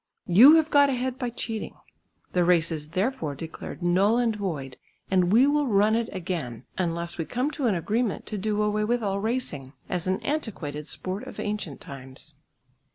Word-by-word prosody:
You 240 - +8
have 320 -1 +3
got 285 -1 +6
ahead 255 0 -2
by 250 -3 -1
cheating. 225 -2 -5 0.6
The 180 - +3
race 170 -1 +3
is 150 -2 -5
therefore 190 - -1
declared 160 +4 -8
null 195 +6 +3
and 235 -3 +1
void 150 -11 -4 0.3
and 180 -1 +3
we 235 +5 +6
will 290 0 +2
run 210 -1 +3
it 230 0 0
again, 165 - -4
unless 170 -1 -2
we 165 - -1
come 255 - -1
to 290 -5 -1
an 210 - +2
agreement 215 +6 -1
to 215 - -4
do 210 +1 0
away 210 0 +1
with 235 +2 0
all 200 -1 0
racing, 200 - -3 0.2
as 180 -1 -2
an 190 +2 +1
antiquated 185 - -3
sport 190 +2 -4
of - - -9
ancient 205 -8 -4
times." 135 +2 -9
200 Hz, 180 wpm, -26 LUFS, 170-235 Hz, 0.6 s, You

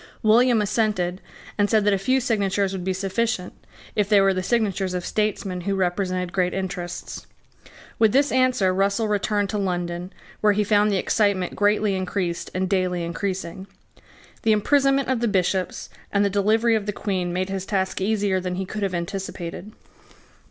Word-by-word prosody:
William 230 +1 +4
assented, 200 -4 0 0.4
and 205 0 +3
said 215 -2 +3
that 205 - +4
a - - +2
few 255 +7 +2
signatures 200 -5 0
would 185 -2 -4
be 190 - -1
sufficient, 195 +1 -2 0.4
if 210 -2 +1
they 205 -2 +6
were 195 0 +4
the 185 - -1
signatures 195 -3 0
of 180 - -3
statesmen 200 -4 -1
who 195 +2 -1
represented 185 -1 -1
great 180 -1 0
interests. 180 -2 -5 0.7
With 220 -2 +5
this 280 +4 +3
answer 255 -7 +2
Russell 200 +4 +1
returned 205 -1 0
to 210 - -1
London, 175 -1 -3 0.3
where 210 -1 +4
he 210 +1 +1
found 210 0 +3
the 200 - +1
excitement 195 -2 +1
greatly 210 0 +2
increased 185 -2 -2
and 185 0 0
daily 185 -2 0
increasing. 185 +1 -4 0.7
The 220 - +3
imprisonment 275 +5 +2
of 260 -2 0
the 235 - +1
Bishops 185 -2 -1 0.2
and 200 0 +2
the 200 - 0
delivery 220 +4 +2
of 215 -2 0
the 205 - -1
Queen 185 -4 -2
made 185 +2 -2
his 195 0 -4
task 190 -2 -1
easier 200 -2 +1
than 180 0 -3
he 190 +1 -3
could 210 +3 -6
have 195 -2 -1
anticipated. 175 +1 -5
195 Hz, 175 wpm, -23 LUFS, 185-215 Hz, 0.7 s, they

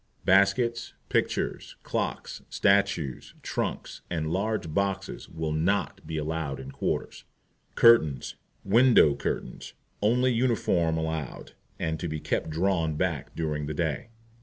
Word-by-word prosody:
Baskets, 115 +5 +3 0.2
Pictures, - - -1
Clocks, - - -3
Statues, 90 -8 +1
Trunks, - - -3
and 80 -2 -2
large 100 -3 -1
Boxes 95 0 -2
will 80 -1 -3
NOT 85 +6 -1
be 80 - -3
allowed 75 -3 -3
in 65 0 -8
quarters. - - -3 0.5
Curtains 80 - +5 0.3
WINDOW 115 - +6
CURTAINS - - -4 0.3
Only 125 +4 +3
uniform 100 -9 +1
allowed, 80 -3 -4 0.3
and 80 -1 -2
to 90 - -3
be 80 -1 -3
kept - - -2
drawn 80 -1 0
back 80 -4 -2
during 75 -2 -2
the 75 - -4
day. 80 - -2
80 Hz, 120 wpm, -27 LUFS, 75-100 Hz, 0.5 s, WINDOW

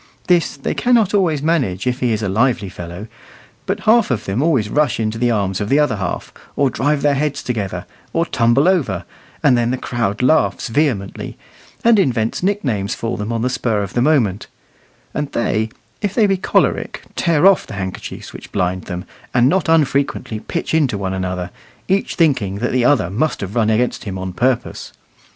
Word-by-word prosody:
This 175 -5 +2
they 140 - -2
cannot 235 -5 +2
always 165 -8 +2
manage 135 - 0
if 125 0 0
he 125 -2 +1
is 110 0 -1
a - - 0
lively 110 0 +1
fellow, 90 +3 -8 0.6
but 195 +2 -1
half 225 +4 +4
of 125 -6 -1
them 100 +6 -1
always 140 -9 +2
rush 145 +2 +1
into 110 0 -1
the 120 0 +2
arms 100 -4 0
of 105 - -2
the 140 - +4
other 150 -7 +2
half, 95 -3 -4 0.2
or 140 -2 +2
drive 145 +1 0
their 145 -1 +4
heads 145 +1 -1
together, 100 -7 -3 0.3
or 165 0 +1
tumble 120 +3 +2
over; 140 - +1 0.4
and 135 -4 +5
then 120 -1 +1
the 130 - 0
crowd 115 -4 -2
laughs 145 -1 +2
vehemently, 115 -7 -1 0.5
and 230 -2 +5
invents 115 - 0
nicknames 135 - -1
for 115 0 -3
them 105 +2 -4
on 115 -1 -1
the - - +2
spur 115 -4 0
of 100 - -6
the 120 - +1
moment; 120 -9 +2 0.7
and 145 -1 -3
they, 110 -1 0 0.3
if 205 -2 -2
they 225 - +4
be 195 -1 +3
choleric, 185 - 0
tear 170 -1 +2
off 195 -1 +5
the - - -7
handkerchiefs 95 -2 -6
which - - -11
blind 90 0 -1
them, 90 +1 -5 0.3
and 125 0 +5
not 180 +3 +1
unfrequently 140 -7 +1
pitch 165 +10 -4
into 145 -9 +2
one 95 -1 -3
another, 90 -1 -3 0.4
each 195 +1 0
thinking 130 - +2
that 120 +5 -2
the 125 -1 +2
other 125 -10 +3
must 140 +10 0
have 100 0 -5
run 110 -2 +2
against 120 +3 0
him 95 -2 -4
on 95 -1 -5
purpose. 125 +3 -1
125 Hz, 190 wpm, -19 LUFS, 105-150 Hz, 0.7 s, and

